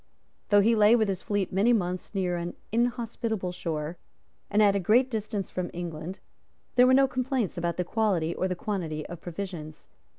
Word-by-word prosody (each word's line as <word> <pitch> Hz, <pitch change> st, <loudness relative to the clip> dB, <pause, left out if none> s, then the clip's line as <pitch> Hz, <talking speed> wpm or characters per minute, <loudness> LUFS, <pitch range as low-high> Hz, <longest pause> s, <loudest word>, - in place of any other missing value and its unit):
Though 205 Hz, -1 st, +6 dB
he 225 Hz, +3 st, +4 dB
lay 215 Hz, +1 st, +6 dB
with 220 Hz, -3 st, +2 dB
his 190 Hz, -2 st, -2 dB
fleet 205 Hz, -3 st, -1 dB
many 210 Hz, +6 st, +4 dB
months 185 Hz, -2 st, -2 dB
near 180 Hz, -2 st, 0 dB
an 175 Hz, 0 st, -4 dB, 0.2 s
inhospitable 230 Hz, -4 st, -1 dB
shore, 160 Hz, -1 st, -4 dB, 0.5 s
and 210 Hz, +1 st, +4 dB
at 200 Hz, -1 st, +5 dB
a -, -, +2 dB
great 240 Hz, +8 st, +3 dB
distance 215 Hz, -3 st, -3 dB
from 180 Hz, -1 st, -3 dB
England, 175 Hz, +1 st, -5 dB, 0.6 s
there 250 Hz, 0 st, +6 dB
were 260 Hz, -, +5 dB
no 270 Hz, 0 st, +5 dB
complaints 255 Hz, -5 st, -1 dB
about 170 Hz, -1 st, -2 dB
the 180 Hz, -, +1 dB
quality 180 Hz, -5 st, 0 dB
or 185 Hz, -, -1 dB
the 180 Hz, -, -2 dB
quantity 170 Hz, -6 st, -3 dB
of 175 Hz, -1 st, -8 dB
provisions. 170 Hz, -4 st, -7 dB
195 Hz, 185 wpm, -27 LUFS, 175-220 Hz, 0.6 s, Though